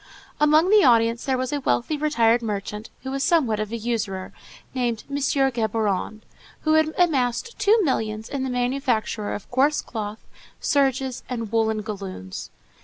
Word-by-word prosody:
Among 305 +5 +4
the 420 -2 +7
audience 230 -1 +4
there 265 -2 +1
was 255 +2 -2
a 290 - 0
wealthy 270 +2 0
retired 240 -6 +2
merchant, 210 0 -4
who 265 - -4
was 275 0 -2
somewhat 270 -9 +2
of 215 0 -3
a 230 - -2
usurer, 215 -5 -3 0.4
named 240 -4 -1
M. 280 - -1
Géborand, 225 -7 0 0.4
who 310 - +2
had 315 0 +3
amassed 310 - +1
two 420 +2 +4
millions 220 -7 -1
in 275 -2 -3
the 265 - -2
manufacture 245 -4 -1
of 205 - -9
coarse 275 +4 +3
cloth, 215 -2 -6 0.4
serges, 270 -3 +1
and 230 -4 -4
woollen 220 -1 +1
galloons. 195 - -6
245 Hz, 155 wpm, -24 LUFS, 220-280 Hz, 0.4 s, the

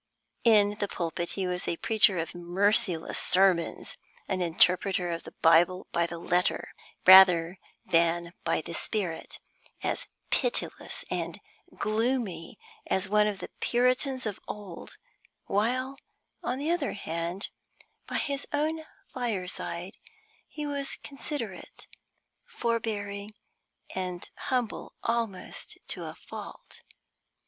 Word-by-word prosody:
In 210 -2 +5
the 205 - 0
pulpit 170 -1 -3
he 195 - -2
was 180 0 -2
a 170 - 0
preacher 215 -3 +4
of 165 0 -3
merciless 175 0 +2
sermons 185 -3 +3 0.3
an 190 -2 -1
interpreter 180 +1 +3
of 165 0 -4
the - - -10
Bible 170 +3 +5
by 170 0 +2
the 170 - -6
letter 175 +2 0 0.3
rather 180 -2 +8 0.3
than 170 0 +2
by 165 - +1
the 170 - -7
spirit, 180 -2 -2 0.5
as - - -1 0.2
pitiless - - 0
and - - -2 0.4
gloomy 215 -4 -1 0.3
as 190 0 +2
one 210 +1 +4
of 205 -2 -2
the - - -7
Puritans 255 +2 +1
of 210 -2 -3
old; 200 -5 -8 0.5
while, 255 +6 0 0.4
on 250 - -2
the 295 +4 0
other 345 - 0
hand, 170 +1 -3 0.6
by - - -2
his 280 -1 -1
own 310 +2 0 0.3
fireside 190 -6 -3 0.5
he 300 -1 -5
was 280 -1 -2
considerate, 275 -8 -6 0.6
forbearing, 215 - -2 0.6
and 180 -2 -4
humble 250 -4 -2
almost 230 -5 -2
to - - -3
a - - -7
fault. - - -10
200 Hz, 115 wpm, -29 LUFS, 175-235 Hz, 0.6 s, rather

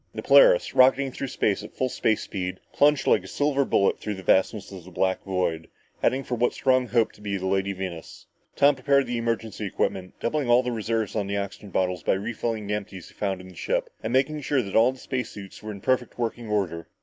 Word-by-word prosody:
The - - -5
Polaris, - - +6
rocketing 135 +1 +4
through 135 - -5
space 105 -5 0
at 105 - -11
full 130 - 0
space 110 -3 0
speed, 95 -2 -4
plunged 145 0 +3
like - - +3
a - - -10
silver 145 -1 +1
bullet 100 -6 +2
through 105 - -4
the 95 - -9
vastness 95 +3 +1
of 95 -3 -9
the 90 - -12
black 95 +1 0
void, 90 -4 -2 0.3
heading 135 +1 +1
for 125 - -5
what 120 0 +1
Strong 130 -1 +2
hoped 115 -2 +1
to - - -19
be 100 -1 -2
the 95 - -5
Lady 95 +1 0
Venus. 95 -4 -7 0.3
Tom 140 +1 +5
prepared 140 +1 +2
the 120 -1 -2
emergency 115 -2 -2
equipment, 95 -1 -2
doubling 135 +1 -1
all 120 +1 +5
the 125 - -2
reserves 110 -2 -2
on 105 -3 -1
the 100 0 -2
oxygen 100 +1 -5
bottles 90 -1 -1
by - - +1
refilling 110 +2 -3
the 105 - -2
empties 95 -4 -6
he - - -19
found 95 -3 -2
on 95 - -12
the 90 - -14
ship - - -2
and 110 - -3
making 140 +4 +1
sure 135 -2 +1
that 100 - -6
all 120 +4 +4
space 125 -2 -4
suits 100 -2 -10
were 110 - -6
in 100 -2 -9
perfect 130 +1 0
working 120 -1 -3
order. 90 -6 -1
110 Hz, 230 wpm, -25 LUFS, 95-125 Hz, 0.3 s, Polaris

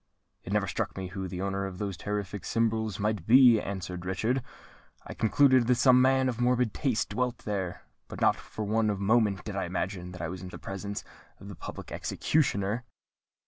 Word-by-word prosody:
"It 95 - -7
never 105 -1 +2
struck 90 - -3
me 95 -1 -4
who 95 0 -5
the 90 +1 -4
owner 100 0 -1
of 95 -2 -8
those 100 -1 -3
terrific 100 +1 -4
symbols 110 -3 0
might 105 -4 -1
be," 120 -2 +7
answered 90 -2 -5
Richard. 110 +8 0 0.6
"I - - -7
concluded 130 +1 +4
that 125 - +4
some 125 +1 +6
man 130 0 +4
of 120 -1 -2
morbid 125 -3 +2
taste 130 -7 0
dwelt 125 +3 -1
there; 95 -4 -3 0.2
but - - -8
not - - +4
for 110 - -7
one 105 -1 +1
moment 105 -1 +2
did 105 - -6
I 95 - -1
imagine 90 0 -3
that 90 - -8
I - - -1
was 95 +1 -6
in 95 - -7
the - - -8
presence 100 +1 -5 0.4
of 100 - -10
the 100 - -8
public - - -8
executioner." 115 -6 0
105 Hz, 190 wpm, -29 LUFS, 95-120 Hz, 0.6 s, be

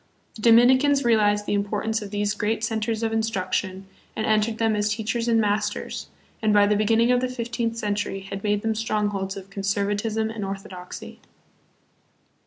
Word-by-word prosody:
The 220 - -11
Dominicans 260 +5 +5
realized 210 -3 +3
the - - -1
importance 210 +2 -1
of 205 - -7
these 205 0 -1
great 215 +1 -1
centers 225 0 -1
of 225 - 0
instruc 220 -4 -2
tion 190 0 -2 0.3
and 220 - -2
entered 215 +1 +1
them 225 -1 +1
as 210 0 0
teachers 230 +1 -2
and 230 -1 +3
masters, 210 -1 -1 0.3
and 215 -1 +2
by 205 -1 +5
the 210 +1 +2
beginning 225 +3 +3
of 250 0 +3
the 255 - -1
fifteenth 235 -2 -3
century 205 -2 -2
had 195 0 -7
made 210 -1 0
them 225 0 +1
strongholds 205 -3 -2
of 195 0 -10
conservatism 205 +3 -1
and 225 -2 -5
orthodoxy. 195 -2 -7
215 Hz, 170 wpm, -24 LUFS, 205-225 Hz, 0.3 s, Dominicans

